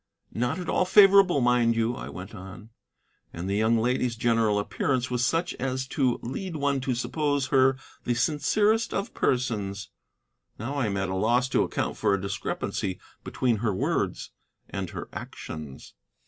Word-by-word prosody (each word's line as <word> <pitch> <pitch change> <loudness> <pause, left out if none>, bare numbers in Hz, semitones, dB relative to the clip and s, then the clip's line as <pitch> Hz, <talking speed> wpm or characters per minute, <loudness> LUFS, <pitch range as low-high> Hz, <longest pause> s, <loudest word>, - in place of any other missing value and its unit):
"Not 125 +7 -1
at 180 - -5
all 185 - +2
favorable, 195 -5 +6
mind 120 -1 +3
you," 115 +1 +1
I - - -7
went 90 +3 -9
on. 95 +4 -10 0.6
"And 85 +2 -6
the 100 - 0
young 110 +2 +3
lady's 125 +1 0
general 115 -2 +2
appearance 125 +5 -1
was 125 0 0
such 165 +7 +1
as 130 0 -2
to 130 -4 +1
lead 170 +9 -5
one 140 -2 0
to 130 -1 -1
suppose 145 +2 0
her 135 -1 +4 0.3
the 120 - 0
sincerest 205 - +1
of 200 +4 -3
persons. 105 -6 -1 0.7
Now 120 +6 -4
I 140 -5 0
am 100 -1 -2
at 95 -1 -1
a 95 - -2
loss 120 +6 +2
to - - +2
account - - -2
for 100 - +2
a - - -3
discrepancy 95 -1 -3 0.2
between 120 -3 0
her 105 -2 -1
words - - -1 0.4
and 95 -3 -4
her - - -7
actions." 75 -4 -8
125 Hz, 165 wpm, -26 LUFS, 105-140 Hz, 0.7 s, favorable